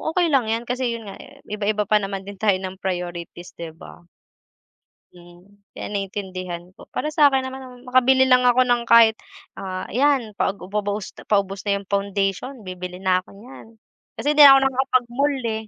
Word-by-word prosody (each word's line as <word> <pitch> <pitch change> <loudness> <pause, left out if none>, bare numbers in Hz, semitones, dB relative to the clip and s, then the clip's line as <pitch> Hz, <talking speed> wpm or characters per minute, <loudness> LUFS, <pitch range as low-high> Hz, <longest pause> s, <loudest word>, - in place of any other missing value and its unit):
okey 345 -3 +2
lang 260 -5 +2
yan 225 +2 -1
kasi 245 -1 -2
yun 230 - -8
nga - - -12 0.2
iba-iba 210 0 -1
pa 210 +1 +2
naman 195 -1 -5
din 200 -1 -10
tayo 205 -3 +3
ng 190 0 -7
priorities 175 -2 -5
di 165 -1 -7
ba? - - -13 1.1
Mm 175 0 -17 0.3
kaya - - -6
naintindihan 185 -3 -5 0.2
ko - - -13
para 305 - -2
sakin 285 -3 +4
naman 260 0 -6
ah 250 - -12
makabili 255 +1 +3
lang 250 0 +5
ako 250 +1 +5
ng 240 -1 +1
kahit, 225 -1 +6 0.4
ah, 185 -1 -6
ayan 260 -3 +1
paubos 205 +1 -2
ah - - -13
paubos 200 -1 -1
na 200 - +2
yung 190 - -24
foundation 200 +5 -2
bibili 180 0 -8
na 185 -1 +3
ako 185 - -11
niyan 235 +4 -13 0.5
kasi 290 - -1
hindi 300 0 +6
na - - +10
ako - - +4
nakakapag-mall 265 +1 0
eh. 225 -1 -1
210 Hz, 175 wpm, -22 LUFS, 190-250 Hz, 1.1 s, na